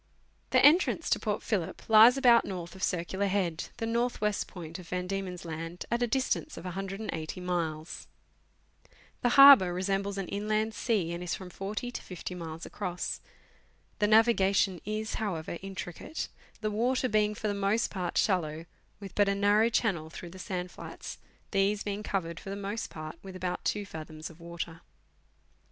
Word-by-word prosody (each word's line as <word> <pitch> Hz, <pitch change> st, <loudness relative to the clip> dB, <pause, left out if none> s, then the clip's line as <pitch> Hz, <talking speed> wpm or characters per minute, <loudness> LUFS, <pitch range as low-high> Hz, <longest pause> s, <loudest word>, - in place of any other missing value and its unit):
The -, -, +5 dB
entrance 320 Hz, +6 st, +4 dB
to -, -, +4 dB
Port -, -, -2 dB
Phillip -, -, -2 dB
lies 225 Hz, +4 st, +8 dB
about 240 Hz, -3 st, +6 dB
north 175 Hz, -3 st, -6 dB
of 190 Hz, -, -12 dB
Circular 190 Hz, +2 st, 0 dB
Head, 185 Hz, -5 st, 0 dB
the 230 Hz, -, -2 dB
north 235 Hz, +2 st, 0 dB
west 210 Hz, -1 st, 0 dB
point 165 Hz, -1 st, -8 dB
of 180 Hz, -, -11 dB
Van 180 Hz, 0 st, -2 dB
Diemen's 185 Hz, -2 st, -4 dB
Land, 165 Hz, +2 st, -5 dB
at 235 Hz, +1 st, +1 dB
a 240 Hz, -, +3 dB
distance 265 Hz, +5 st, -1 dB
of -, -, -8 dB
180 190 Hz, -2 st, -4 dB
miles. 170 Hz, -3 st, -3 dB, 1.1 s
The 245 Hz, +2 st, +2 dB
harbour 275 Hz, -10 st, +10 dB
resembles 195 Hz, +2 st, -1 dB
an 195 Hz, -2 st, -3 dB
inland 215 Hz, +2 st, 0 dB
sea, 205 Hz, -9 st, 0 dB
and 170 Hz, -, -5 dB
is 180 Hz, -, -2 dB
from 185 Hz, -1 st, -9 dB
40 215 Hz, +7 st, -4 dB
to -, -, -5 dB
50 180 Hz, 0 st, -7 dB
miles 165 Hz, -2 st, -6 dB
across. 180 Hz, -3 st, -4 dB, 0.8 s
The 210 Hz, -, +3 dB
navigation 200 Hz, -4 st, +4 dB
is, 215 Hz, +1 st, -3 dB
however, 170 Hz, -5 st, -3 dB
intri 190 Hz, -2 st, -6 dB
cate, 315 Hz, -, -5 dB, 0.3 s
the 215 Hz, -1 st, -1 dB
water 250 Hz, +4 st, +1 dB
being 210 Hz, -1 st, +2 dB
for 215 Hz, -, -3 dB
the 205 Hz, -, 0 dB
most 200 Hz, +3 st, +1 dB
part 180 Hz, -3 st, -3 dB
shallow, 165 Hz, -5 st, +1 dB, 0.3 s
with 200 Hz, -2 st, -9 dB
but 205 Hz, -1 st, +3 dB
a 200 Hz, -, +1 dB
narrow 205 Hz, +3 st, +4 dB
channel 190 Hz, -9 st, 0 dB
through 170 Hz, +1 st, -9 dB
the 185 Hz, -, -11 dB
sand 180 Hz, -1 st, -4 dB
flats, -, -, -8 dB, 0.3 s
these 200 Hz, +1 st, +2 dB
being 205 Hz, 0 st, -3 dB
covered 170 Hz, -5 st, -3 dB
lor 195 Hz, -, -7 dB
the -, -, -6 dB
most 205 Hz, +3 st, -3 dB
part 155 Hz, +1 st, -8 dB
with 190 Hz, -1 st, -9 dB
about 180 Hz, -1 st, -3 dB
2 205 Hz, -1 st, 0 dB
fathoms 155 Hz, -2 st, -8 dB
of 165 Hz, -, -17 dB
water. 170 Hz, -1 st, -6 dB
195 Hz, 175 wpm, -30 LUFS, 175-215 Hz, 1.1 s, harbour